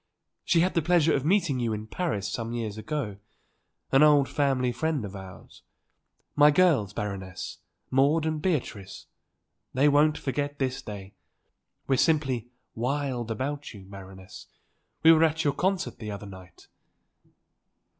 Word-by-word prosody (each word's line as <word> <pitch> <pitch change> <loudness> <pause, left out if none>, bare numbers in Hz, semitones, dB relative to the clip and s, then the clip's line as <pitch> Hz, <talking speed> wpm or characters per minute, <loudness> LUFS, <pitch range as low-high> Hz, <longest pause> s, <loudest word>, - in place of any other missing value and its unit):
She 170 - +3
had 185 +2 +1
the 170 - +2
pleasure 165 -1 +3
of 135 - 0
meeting 165 -5 +2
you 115 -2 -1
in 105 0 -5
Paris 110 - -2
some 115 +3 -4
years 110 -4 -3
ago. 110 -3 -4 0.7
An 135 - +5
old 145 -3 +6
family 135 -2 +1
friend 155 -2 -2
of 100 0 -8
ours. 95 -1 -12 0.7
My 150 0 +7
girls, 150 - +3
Baroness; 95 -3 -6 0.3
Maude 145 +5 +3
and 155 -1 -2
Beatrice. 125 - -3 0.7
They 135 +3 +4
won't 150 +1 +4
forget 145 +1 -3
this 130 -1 -2
day. 100 -2 -9 0.7
We're 135 - +1
simply 135 -7 +1 0.2
wild 125 -1 -2
about 140 +4 -4
you, 95 -2 -12
Baroness. 95 -1 -12 0.6
We 160 - +9
were 160 0 +5
at 160 0 +1
your 145 -3 +2
concert 190 +4 -1
the 110 - -6
other 100 0 -6
night." 95 -3 -13
135 Hz, 145 wpm, -27 LUFS, 105-150 Hz, 0.7 s, We